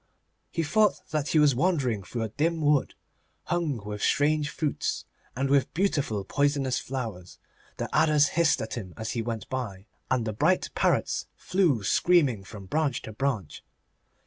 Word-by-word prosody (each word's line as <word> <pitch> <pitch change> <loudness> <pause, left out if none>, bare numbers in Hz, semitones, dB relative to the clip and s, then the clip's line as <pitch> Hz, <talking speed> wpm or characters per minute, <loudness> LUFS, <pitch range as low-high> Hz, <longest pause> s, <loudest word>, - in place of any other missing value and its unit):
He 165 - -1
thought 210 +7 +3
that 150 -2 -1
he 155 - +1
was 150 -2 +5
wandering 135 - +1
through 115 +4 -4
a 110 - -3
dim 160 +8 0
wood, 150 -2 +2 0.5
hung 150 -11 -2
with 105 0 -5
strange 150 +1 +2
fruits 155 -2 -2 0.3
and 135 +2 0
with 140 0 +2
beautiful 145 - 0
poisonous 140 +2 +1
flowers. 110 -9 -6 0.4
The - - -2
adders 150 -2 +4
hissed 165 -5 +2
at 110 - -6
him 95 -7 -6
as 110 0 -4
he 115 - -1
went 115 +1 -4
by, 115 -8 -4 0.2
and 130 -3 +1
the 110 - -2
bright 160 - +1
parrots - - +1
flew 170 - +1
screaming 140 - +3
from 100 0 -10
branch 145 +3 -1
to 110 - -8
branch. 115 - -2
135 Hz, 160 wpm, -27 LUFS, 110-155 Hz, 0.5 s, was